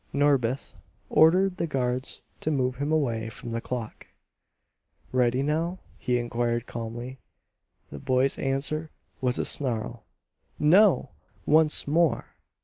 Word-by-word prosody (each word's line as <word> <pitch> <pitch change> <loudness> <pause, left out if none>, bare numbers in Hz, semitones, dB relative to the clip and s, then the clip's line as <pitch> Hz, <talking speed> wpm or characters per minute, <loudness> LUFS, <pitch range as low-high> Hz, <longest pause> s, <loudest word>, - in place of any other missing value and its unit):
Norbith 140 -3 +1 0.4
ordered 180 +4 +4
the 170 - -1
guards 130 -3 -2 0.2
to - - -2
move 130 -4 0
him 145 +2 -2
away 115 -8 0
from 115 +1 -8
the 115 0 -2
clock. 120 -3 -6 1.0
"Ready 125 +1 +2
now?" 165 +5 -1 0.2
he 125 -1 0
inquired 120 0 -1
calmly. 120 +3 -6 0.7
The 70 - -7
boy's 130 - +1
answer 145 +4 -2 0.3
was 125 -1 +1
a - - -1
snarl. 120 -4 0 0.5
"No!" 175 - +4 0.3
"Once 155 -1 +4
more!" 160 +1 +1
130 Hz, 120 wpm, -26 LUFS, 120-155 Hz, 1.0 s, ordered